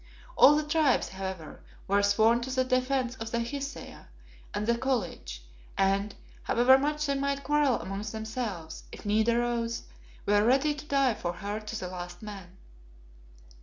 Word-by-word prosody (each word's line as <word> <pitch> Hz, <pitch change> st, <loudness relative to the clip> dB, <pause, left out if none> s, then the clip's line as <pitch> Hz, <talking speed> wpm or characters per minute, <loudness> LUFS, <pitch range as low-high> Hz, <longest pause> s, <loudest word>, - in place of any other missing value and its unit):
All 295 Hz, -, +8 dB
the 305 Hz, -, +1 dB
Tribes, 300 Hz, -3 st, +2 dB
however, 190 Hz, -4 st, -6 dB, 0.3 s
were 200 Hz, +1 st, +3 dB
sworn 220 Hz, +4 st, +4 dB
to 250 Hz, -, -5 dB
the 260 Hz, 0 st, +1 dB
defence 255 Hz, -1 st, 0 dB
of 225 Hz, -2 st, -5 dB
the 235 Hz, -, -1 dB
Hesea 280 Hz, +3 st, -6 dB, 0.4 s
and 210 Hz, -, -2 dB
the 235 Hz, +1 st, +2 dB
College, 220 Hz, -, -3 dB, 0.3 s
and, 195 Hz, +1 st, +1 dB, 0.3 s
however 255 Hz, +3 st, +5 dB
much 300 Hz, +2 st, -1 dB
they 280 Hz, -, +1 dB
might 280 Hz, 0 st, -1 dB
quarrel 295 Hz, -3 st, +2 dB
amongst 195 Hz, +2 st, -5 dB
themselves, 220 Hz, -7 st, -5 dB
if -, -, -11 dB
need 215 Hz, +2 st, +2 dB
arose, 235 Hz, 0 st, 0 dB, 0.4 s
were 205 Hz, 0 st, +4 dB
ready 270 Hz, +6 st, +3 dB
to 295 Hz, +1 st, -9 dB
die 275 Hz, -4 st, +3 dB
for 175 Hz, -4 st, -4 dB
her 205 Hz, +4 st, -4 dB
to 215 Hz, +1 st, -6 dB
the 180 Hz, -, -4 dB
last 180 Hz, +1 st, -8 dB
man. 195 Hz, -3 st, -9 dB
235 Hz, 160 wpm, -29 LUFS, 200-270 Hz, 0.4 s, All